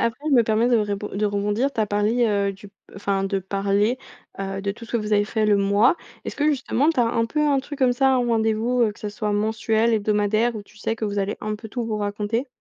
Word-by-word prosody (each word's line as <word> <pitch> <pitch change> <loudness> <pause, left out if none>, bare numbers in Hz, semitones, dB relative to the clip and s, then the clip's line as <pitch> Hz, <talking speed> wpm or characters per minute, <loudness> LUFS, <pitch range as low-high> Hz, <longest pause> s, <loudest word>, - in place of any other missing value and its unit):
après, 280 +7 -1
je - - +4
me 240 - +6
permets 220 +2 +2
de 245 - +4
rébon 205 -1 -2
de 210 +2 +1
rebondir. 205 +6 0
Tu 225 - -2
as 215 - +2
parlé, 210 +4 +1
heu, 200 -2 +1
du 195 +1 -14 0.2
enfin 195 -1 -1
de 195 0 0
parler, 200 +5 0 0.4
heu, 195 0 -3
de 200 - -1
tout 230 +2 -11
ce 225 - -13
que - - +2
vous 210 -1 -3
avez 205 0 +4
fait 215 0 0
le 205 -1 +4
mois. 200 - +3 0.3
Est-ce - - -6
que 295 - +1
justement 280 0 +1
tu 290 - 0
as 240 - +4
un 230 0 +1
peu 300 +6 -2
un 290 -2 +3
truc 290 +1 -8
comme 255 -2 +3
ça, 265 +1 +3
ou - - +1
un - - +3
rendez-vous, 225 +3 +1
heu, 215 -2 +2
que - - -19
ce 210 - -4
soit 210 0 -3
mensuel, 220 +2 +1
hebdomadaire 215 +2 +1
où 210 - -6
tu 210 - -22
sais 225 - -1
que 220 - -3
vous 205 -1 -2
allez 200 +1 -1
un 215 0 -3
peu 220 +1 -10
tout 240 +1 -3
vous 220 -2 -2
raconter? 210 +5 -2
215 Hz, 270 wpm, -23 LUFS, 205-235 Hz, 0.4 s, me